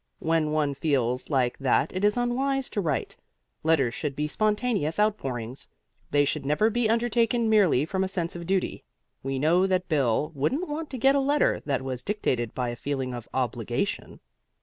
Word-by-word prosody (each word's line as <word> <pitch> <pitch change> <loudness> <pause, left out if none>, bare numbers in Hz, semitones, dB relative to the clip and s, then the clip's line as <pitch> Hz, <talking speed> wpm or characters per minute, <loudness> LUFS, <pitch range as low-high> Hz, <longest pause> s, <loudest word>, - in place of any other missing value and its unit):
When 160 -1 +1
one 150 -2 +1
feels 130 -4 0
like 130 -4 +1
that 135 +4 +1
it 185 - -2
is 210 +2 +3
unwise 265 +2 0
to 205 - -1
write. 150 -6 -2 0.4
Letters 145 -7 +2
should 145 +1 -3
be 150 - -1
spontaneous 210 -2 0
outpourings: 135 - -1 0.4
they 145 0 +3
should 145 0 -2
never 150 +11 +2
be 235 -1 +1
undertaken 235 0 +2
merely 185 -10 +4
from 190 +3 -1
a - - 0
sense 175 -3 -3
of 170 -1 -7
duty. 190 -1 -1 0.4
We 135 0 -3
know 170 +7 +3
that 185 -1 0
Bill 145 0 +1
wouldn't 260 - -1
want 305 +1 -4
to 260 - -5
get 270 +3 +4
a 280 - +3
letter 285 +2 +2
that 135 -2 0
was 130 -2 -4
dictated 125 - -2
by 125 -1 -1
a 120 - -4
feeling 130 -1 -3
of 120 -2 -7
obligation. 125 - -2
160 Hz, 180 wpm, -26 LUFS, 135-215 Hz, 0.4 s, merely